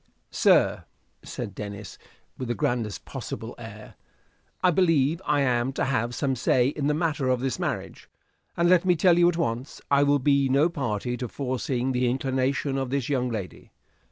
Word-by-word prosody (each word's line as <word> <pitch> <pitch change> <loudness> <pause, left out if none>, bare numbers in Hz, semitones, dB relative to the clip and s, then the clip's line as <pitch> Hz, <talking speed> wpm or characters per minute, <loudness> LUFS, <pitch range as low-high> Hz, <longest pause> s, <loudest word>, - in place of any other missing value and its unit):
"Sir," - - +3 0.4
said 100 - -6
Denis, 100 0 -8 0.4
with 130 - -5
the 120 - -1
grandest 110 -3 -2
possible - - -6
air, - - -10 0.7
"I 180 - +5
believe 165 -2 +2
I 145 -1 +2
am 125 -1 +1
to - - -1
have 120 -2 -1
some 135 -2 0
say 125 +1 +2
in 145 0 -2
the 150 - +1
matter 155 -4 -1
of 125 -1 +2
this 130 +1 -2
marriage; - - -4 0.5
and 170 0 +3
let 180 -1 +5
me 180 -1 +3
tell 175 +1 +4
you 175 0 +6
at 170 - -2
once, 120 -2 -3
I 140 0 +5
will 145 0 +4
be 140 0 +2
no 140 +5 +3
party 125 - -3
to 125 - -4
forcing 130 0 -2
the 125 -1 +1
inclination 135 +1 -1
of 135 -1 -3
this 135 -1 -2
young 125 -3 0
lady. 105 -6 -7
135 Hz, 180 wpm, -26 LUFS, 125-145 Hz, 0.7 s, you